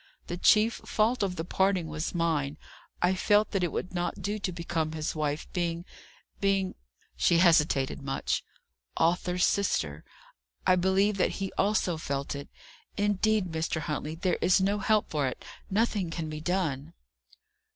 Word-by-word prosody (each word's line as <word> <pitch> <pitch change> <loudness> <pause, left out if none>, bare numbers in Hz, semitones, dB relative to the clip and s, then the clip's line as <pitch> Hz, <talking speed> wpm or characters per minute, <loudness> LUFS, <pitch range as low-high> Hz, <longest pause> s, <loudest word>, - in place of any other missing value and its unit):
"The 175 - -4
chief 215 +5 +4
fault 225 +4 +1
of 190 -3 0
the 160 - -4
parting 190 -1 +1
was 155 +2 -4
mine. 155 -4 0 0.5
I 180 +1 +4
felt 205 +3 +3
that 195 -3 0
it 175 - 0
would 180 - -4
not 175 -1 -2
do 210 +1 -2
to 190 - -2
become 165 -2 -2
his 155 0 -2
wife, 150 0 -2
being 170 -1 -2 0.5
being 195 -1 +1 0.2
" - - -37
she 170 - +3
hesitated 155 -7 +3
much 135 -1 -1 0.5
"Arthur's 180 +2 +2
sister. 80 - 0 0.6
I 185 - +5
believe 190 +3 +2
that 185 - +1
he 195 -1 -4
also 190 -4 +1
felt 140 -3 -3
it. 140 0 -7 0.5
Indeed, 205 -2 +1
Mr. 160 0 -1
Huntley, 150 +1 -3
there 180 +2 0
is 185 +1 +4
no 200 +2 +1
help 215 +1 +2
for 145 -3 +1
it; 130 - -6 0.2
nothing 205 -3 +1
can 165 -1 -4
be 155 0 -6
done." 160 -4 -2
175 Hz, 160 wpm, -29 LUFS, 155-195 Hz, 0.6 s, I